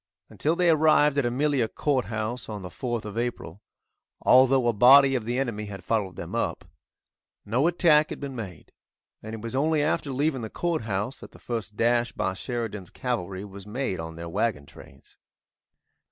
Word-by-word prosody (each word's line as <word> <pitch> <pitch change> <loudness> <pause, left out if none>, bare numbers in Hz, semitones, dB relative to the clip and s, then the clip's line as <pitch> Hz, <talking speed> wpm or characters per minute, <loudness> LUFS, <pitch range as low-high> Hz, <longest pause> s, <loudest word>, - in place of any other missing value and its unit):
Until 155 +3 0
they 175 -1 +4
arrived 150 -2 +4
at 130 - +1
Amelia 135 -1 +1
Courthouse, 115 -3 -2
on 105 -3 -6
the 90 - -6
4th 120 +4 -4
of 105 +2 -4
April, 120 -6 -4 0.6
although 130 -1 +5
a 120 - +3
body 135 +5 +7
of 120 -4 -1
the 120 +2 -2
enemy 115 -6 -2
had 100 -3 -8
followed 100 -3 -1
them - - -7
up, - - -2 0.8
no 125 +9 +2
attack 160 -3 +4
had - - -6
been 140 -2 -6
made, 95 -9 -8 0.5
and 110 +1 -7
it 110 - -9
was 115 +3 -5
only 150 +2 +2
after 145 -2 -1
leaving 135 0 0
the 110 - -5
Courthouse 115 - -2
that - - -12
the - - -14
first 115 -3 -5
dash 120 +1 +2
by - - -1
Sheridan's 110 -3 -5
cavalry 100 -6 -4
was 100 0 -11
made 110 -4 -3
on 80 0 -6
their 85 +1 -7
wagon 95 -4 -1
trains. 70 -1 -16
120 Hz, 175 wpm, -26 LUFS, 105-135 Hz, 0.8 s, body